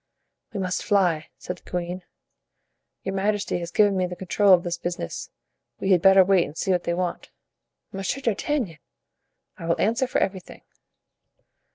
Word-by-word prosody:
"We 210 - -4
must 185 -1 -2
fly," 175 -6 +2
said 180 0 -6
the - - -18
queen. 180 +1 -3 1.0
"Your 190 - -3
majesty 205 -1 0
has 170 -1 -5
given 205 +2 +3
me 185 -1 +1
the 180 - -6
control 195 +2 +2
of 180 -2 +6
this 175 -1 -3
business; 175 - -4 0.5
we 195 - 0
had 180 -3 +5
better 190 0 +7
wait 190 -2 +4
and 155 - -9
see 190 - 0
what 180 -1 +1
they 170 - 0
want." 180 0 -3 0.6
"Monsieur 195 +7 -3
d'Artagnan!" 230 - -1 0.8
"I 165 - -6
will 170 - +1
answer 235 +5 +1
for - - -1
everything." 190 -2 -3
185 Hz, 165 wpm, -25 LUFS, 175-200 Hz, 1.0 s, better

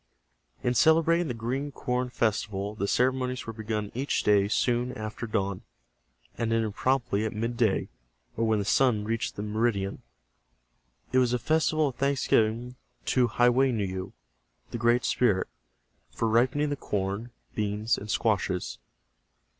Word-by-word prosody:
In 125 - +2
celebrating 165 +4 +4
the 125 - -3
Green 130 +6 -3
Corn 125 -1 -2
Festival 105 -4 -1
the 100 -2 -2
ceremonies 130 +2 0
were 115 - -5
begun 110 -1 -3
each 135 +4 -1
day 100 -1 +4
soon 120 +3 +1
after 110 0 -5
dawn, 100 -3 -1 0.7
and 115 -1 -1
ended 110 -2 +1
promptly 120 -4 0
at 110 - -2
midday, 115 -2 0 0.5
or 115 - 0
when 110 -1 +3
the 100 - -1
sun 115 -1 +3
reached 115 +1 -2
the 100 - -4
meridian. 105 -2 -1 1.1
It 130 - +4
was 125 -1 +2
a - - +3
festival 155 +3 +2
of 125 - -11
thanksgiving 125 -3 +1 0.4
to 125 -2 +4
Ha 120 +2 +3
weu 130 +2 +3
ne 110 -4 -1
yu, 95 0 -5 0.6
the 120 - -4
Great 120 +2 +3
Spirit, 105 -7 +2 0.6
for 115 - -2
ripening 130 +6 +2
the - - 0
corn, 100 -2 -3 0.2
beans 105 +1 0
and 105 - -8
squashes. 100 -5 0
115 Hz, 145 wpm, -28 LUFS, 105-125 Hz, 1.1 s, celebrating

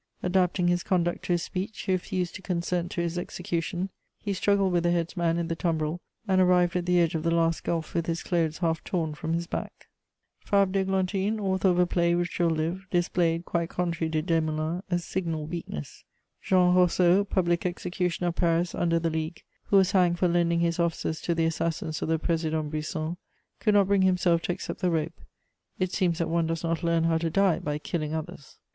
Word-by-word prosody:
Adapting 180 0 +2
his 175 0 +2
conduct 175 -1 0
to 175 - +1
his 170 -1 0
speech, 190 +4 -4
he - - -2
refused 180 -1 -1
to 190 - -8
consent 175 -1 -2
to 175 - -2
his 170 +1 -2
execution; 175 +1 -3 0.3
he 205 - -2
struggled 195 -1 +2
with 175 - +3
the 175 - +1
headsman 170 0 0
in 170 -1 -1
the 165 - -2
tumbril, 160 -1 -1 0.3
and 190 -1 +3
arrived 180 -1 +3
at 180 -1 -1
the 180 0 +4
edge 165 -2 +2
of 160 - -1
the 165 - 0
last 165 0 +1
gulf 165 -2 -2
with 170 -1 -1
his 165 -1 -2
clothes 165 -3 0
half 165 -2 -1
tom 165 -4 -2
from 160 +2 -3
his 170 +1 -1
back. - - -6 0.6
Fabre 200 -2 +2
d'Églantine, 195 +2 0
author 190 -1 +1
of 180 -1 +3
a 180 - +5
play 170 -1 +2
which 175 +1 -2
will 170 -1 +3
live, 165 +4 -2
displayed, 175 -1 +1
quite 170 -1 -1
contrary 170 -2 -1
to 155 -1 -1
Desmoulins, 160 0 0
a 175 - +2
signal 170 -3 -3
weakness. 155 - -6 0.4
Jean 180 -1 +4
Roseau, 180 +1 +4
public 175 -3 0
executioner 180 0 -1
of 170 - -5
Paris 170 0 +1
under 170 -1 +1
the 165 0 0
League, 160 +1 -4 0.2
who 200 - +3
was 190 -1 +4
hanged 180 -3 +3
for 180 - +2
lending 170 -1 +2
his 170 0 0
offices 165 -2 -1
to 170 - -1
the 165 0 +2
assassins 160 -1 -2
of - - -2
the 160 - +2
Président 160 -2 -1
Brisson, 155 +2 -3 0.4
could 210 -2 +2
not 200 -1 +6
bring 200 -1 +3
himself 180 -2 +3
to - - -2
accept - - -5
the 185 - +1
rope. 165 0 -2 0.6
It 185 -1 -1
seems 175 -4 +1
that 170 - 0
one 165 0 +1
does 165 0 -2
not 165 -1 -1
learn 170 -1 +2
how 165 -1 +2
to 165 0 -1
die 195 0 +2
by 150 0 -2
killing 155 0 -3
others. 150 -3 -7
170 Hz, 205 wpm, -27 LUFS, 165-180 Hz, 0.6 s, not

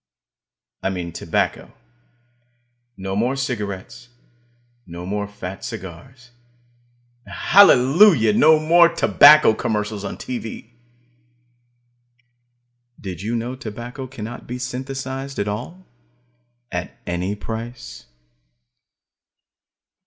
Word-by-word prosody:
I - - -1
mean 90 -3 -5
tobacco. - - -2 1.2
No 95 0 -4
more 120 +6 0
cigarettes; 110 -4 -5 0.8
no 85 +1 -8
more 100 +2 -3
fat 95 -2 -8
cigars 115 +4 -9 0.9
and - - -11
hallelujah! 145 - +5
no 155 +8 +6
more 170 +2 +5
tobacco 150 -5 +6
commercials 105 -1 -3
on - - -5
TV. 120 -2 -7 2.3
Did 90 -3 -7
you 110 +4 -2
know, 120 +2 -3
tobacco 120 +2 -8
cannot 120 -2 -8
be 125 - -5
synthesized 135 +1 -5
at 100 - -1
all, 170 - -6 0.9
at 90 0 -5
any 90 +3 -2
price? 110 - -8
115 Hz, 90 wpm, -21 LUFS, 100-130 Hz, 2.3 s, no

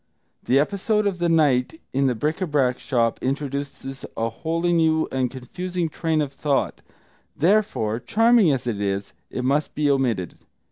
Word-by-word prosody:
The 130 - +2
episode 200 +7 +1
of 195 -3 -1
the 170 0 +1
night 150 -3 +2
in 135 +1 +2
the 125 - +1
bric 150 +10 -2
a 185 - 0
brac 135 -5 +1
shop 115 -4 0
introduces 140 0 -4
a 115 0 0
wholly 165 +8 -1
new 160 -1 +3
and 130 -1 0
confusing 175 +7 -4
train 160 0 0
of 140 -1 -6
thought; 140 -1 -1 0.6
therefore, 160 - +2
charming 225 - +4
as 130 -3 -1
it 110 -4 -2
is, 100 0 -2 0.2
it 125 - -4
must 140 +4 0
be 150 -1 +2
omitted. 120 - -1
140 Hz, 160 wpm, -23 LUFS, 125-165 Hz, 0.6 s, charming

